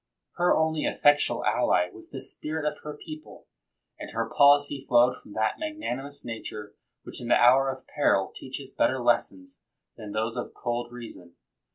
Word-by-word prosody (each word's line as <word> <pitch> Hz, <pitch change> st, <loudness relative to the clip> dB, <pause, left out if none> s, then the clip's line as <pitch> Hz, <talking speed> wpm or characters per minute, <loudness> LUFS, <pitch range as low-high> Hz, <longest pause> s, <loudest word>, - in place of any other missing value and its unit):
Her 175 Hz, 0 st, +3 dB
only 160 Hz, -1 st, +1 dB
effectual 145 Hz, 0 st, +3 dB
ally 90 Hz, 0 st, +2 dB
was -, -, -14 dB
the -, -, -6 dB
spirit 155 Hz, 0 st, -3 dB
of 150 Hz, 0 st, -2 dB
her 150 Hz, -1 st, -8 dB
people, 155 Hz, -1 st, -11 dB, 0.5 s
and -, -, -7 dB
her -, -, -2 dB
policy 145 Hz, -1 st, +4 dB
flowed 125 Hz, +1 st, +4 dB
from 105 Hz, -, -14 dB
that 110 Hz, +1 st, 0 dB
magnan 310 Hz, -, -3 dB
imous 140 Hz, +1 st, -7 dB
nature 105 Hz, -3 st, -7 dB, 0.3 s
which -, -, -5 dB
in 120 Hz, -, -6 dB
the 120 Hz, -, +5 dB
hour 130 Hz, +3 st, +5 dB
of 130 Hz, 0 st, -6 dB
peril 100 Hz, -10 st, +1 dB
teaches 135 Hz, 0 st, -7 dB
better 130 Hz, -, +1 dB
lessons 200 Hz, -, 0 dB, 0.4 s
than 105 Hz, -3 st, -8 dB
those 110 Hz, +3 st, -2 dB
of 120 Hz, -, -5 dB
cold 120 Hz, 0 st, -3 dB
reason. 110 Hz, -8 st, -10 dB
130 Hz, 170 wpm, -27 LUFS, 120-150 Hz, 0.5 s, the